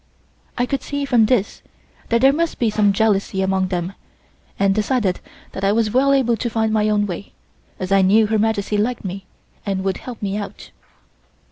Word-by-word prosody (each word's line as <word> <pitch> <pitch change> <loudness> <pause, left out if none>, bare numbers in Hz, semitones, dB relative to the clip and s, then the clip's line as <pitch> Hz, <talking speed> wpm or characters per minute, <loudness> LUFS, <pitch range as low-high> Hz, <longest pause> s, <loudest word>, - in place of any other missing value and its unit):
I 245 - +1
could 275 0 -2
see 285 0 -3
from 240 -5 +3
this 225 -5 0 0.5
that 235 0 +2
there 270 +1 +6
must 335 +2 -1
be 230 -3 +1
some 210 -1 +3
jealousy 195 -2 +1
among 190 0 +1
them 180 0 -3 0.6
and 195 0 +2
decided 210 -2 0 0.3
that 190 - -7
I 195 - +3
was 220 -1 +1
well 265 +4 +3
able 260 -4 +3
to 235 - -2
find 220 -1 0
my 215 -1 +2
own 210 -1 +2
way, 195 0 -7 0.5
as 185 0 -4
I 195 0 +5
knew 210 +4 +4
Her 215 0 0
Majesty 210 -1 0
liked 235 +1 -1
me 190 +1 -6 0.4
and 195 -2 -2
would 190 -1 -1
help 245 -3 -9
me 200 0 -2
out. 205 -1 -8
210 Hz, 195 wpm, -20 LUFS, 195-235 Hz, 0.6 s, there